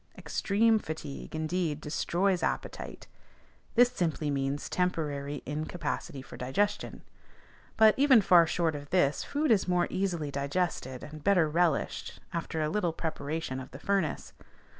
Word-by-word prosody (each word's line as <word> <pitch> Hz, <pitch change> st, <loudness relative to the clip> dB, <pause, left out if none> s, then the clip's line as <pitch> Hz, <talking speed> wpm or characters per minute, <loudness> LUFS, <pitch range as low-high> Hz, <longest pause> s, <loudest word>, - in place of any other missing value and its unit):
Extreme 220 Hz, +2 st, +2 dB
fatigue, 155 Hz, -4 st, -7 dB
indeed, 160 Hz, -1 st, -1 dB
destroys 175 Hz, +4 st, 0 dB
appetite: -, -, -3 dB, 0.7 s
this 245 Hz, +1 st, +6 dB
simply 160 Hz, -8 st, -1 dB
means 140 Hz, +1 st, -1 dB
temporary 145 Hz, -5 st, -2 dB
incapacity 150 Hz, -2 st, -4 dB
for -, -, -11 dB
digestion. 205 Hz, +12 st, -1 dB, 0.7 s
But, 220 Hz, -1 st, +7 dB
even 270 Hz, -4 st, +7 dB
far 175 Hz, -4 st, +6 dB
short 165 Hz, -1 st, +1 dB
of 145 Hz, -1 st, -7 dB
this, 150 Hz, -6 st, +2 dB
food 290 Hz, -1 st, 0 dB
is 205 Hz, -4 st, +3 dB
more 180 Hz, -1 st, +2 dB
easily 175 Hz, -6 st, -1 dB
digested 140 Hz, -2 st, -2 dB
and 150 Hz, 0 st, -9 dB
better 185 Hz, -5 st, +4 dB
relished 165 Hz, -1 st, 0 dB
after 160 Hz, -1 st, -2 dB
a 150 Hz, -, 0 dB
little 175 Hz, -2 st, 0 dB
preparation 155 Hz, -3 st, -3 dB
of 130 Hz, -, -8 dB
the 135 Hz, -, -10 dB
furnace. 195 Hz, -2 st, -1 dB
160 Hz, 135 wpm, -30 LUFS, 145-185 Hz, 0.7 s, But